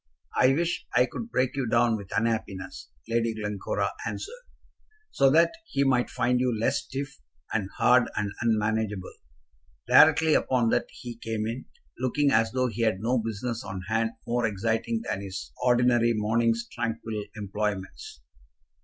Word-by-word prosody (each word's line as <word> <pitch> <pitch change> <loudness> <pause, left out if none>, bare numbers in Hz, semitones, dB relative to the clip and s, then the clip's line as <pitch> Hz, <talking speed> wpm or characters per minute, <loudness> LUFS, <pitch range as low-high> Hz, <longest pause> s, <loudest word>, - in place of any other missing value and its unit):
"I - - +5
wish 170 +2 -1
I 125 +1 +6
could 225 - -7
break 130 - 0
you 135 -3 -1
down 115 0 +3
with 100 -3 -8
unhappiness," 110 -4 -2 0.2
Lady 115 -1 0
Glencora 105 -2 -2
answered, - - -6 0.7
"so 135 - +4
that 165 +4 +5 0.2
he 140 - +1
might 130 -3 +2
find 125 0 +1
you 125 -3 +1
less 115 - +1
stiff, 140 +2 -6 0.3
and 100 -4 -1
hard, 125 0 +4
and 105 -1 -1
unmanageable." 105 -3 0 0.7
Directly 160 -1 +6
upon 125 -5 +2
that - - +1
he 120 -2 -9
came 110 -2 -3
in, 115 +4 -4 0.3
looking 140 +3 +1
as 110 -1 +3
though 130 +1 +1
he 115 -2 -3
had 110 -4 +2
no 120 +4 +1
business 115 +1 -3
on 95 -1 -6
hand 115 +1 +1
more 120 0 +1
exciting 115 +2 -1
than 95 - -3
his 95 -10 -7
ordinary 120 -1 +3
morning's 115 +2 +1
tranquil 110 -2 -3
employments. 100 - -4
115 Hz, 150 wpm, -27 LUFS, 110-125 Hz, 0.7 s, I